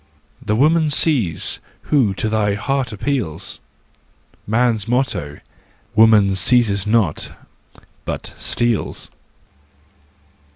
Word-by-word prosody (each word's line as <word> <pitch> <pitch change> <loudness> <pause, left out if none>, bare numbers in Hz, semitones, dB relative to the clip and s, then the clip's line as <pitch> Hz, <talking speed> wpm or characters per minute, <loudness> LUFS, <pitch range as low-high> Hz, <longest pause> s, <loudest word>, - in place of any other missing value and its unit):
ts - - -19
The 105 - +2
woman 155 +5 +3
seize, 140 - +1 0.2
who 120 -10 +2
to 110 - -2
thy 105 -2 +1
heart 135 +4 -2
appeals! 100 - -3 0.9
Man's 110 -1 +1
motto: 110 - -1 0.5
woman 110 -3 +5
seizes 100 -1 +2
not, 105 -7 0 0.7
but - - -5
steals. 120 -3 -1
110 Hz, 90 wpm, -19 LUFS, 100-125 Hz, 0.9 s, woman